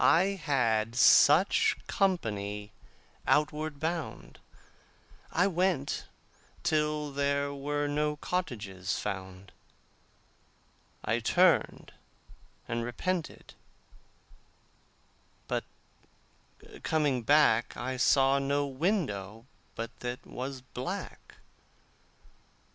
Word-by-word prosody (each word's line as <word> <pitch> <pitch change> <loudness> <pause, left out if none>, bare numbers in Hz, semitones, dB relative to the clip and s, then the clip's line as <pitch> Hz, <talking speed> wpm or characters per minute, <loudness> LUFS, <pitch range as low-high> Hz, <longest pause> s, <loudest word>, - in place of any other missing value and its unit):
I 180 +4 +5
had 115 -6 +1
such 150 +8 +5
company 105 - -1 0.6
outward 150 0 +1
bound. 165 +1 -4 0.9
I 180 - +3
went 180 -6 0 0.6
till 150 -2 0
there 140 0 0
were 145 +1 -2
no 150 +1 0
cottages 105 - -3
found. 95 0 -6 1.5
I 115 +2 +1
turned 175 +9 +2 0.7
and 115 0 -2
repented, 165 +8 -4 1.9
but - - -2 1.2
coming 145 -5 +1
back 120 -3 +3
I 130 +3 -3
saw 135 +1 +4
no 140 +1 0
window 130 - -2 0.3
but 115 +1 -6
that 125 0 -5
was 130 +1 -6
black. 125 0 -7
140 Hz, 75 wpm, -30 LUFS, 115-155 Hz, 1.9 s, I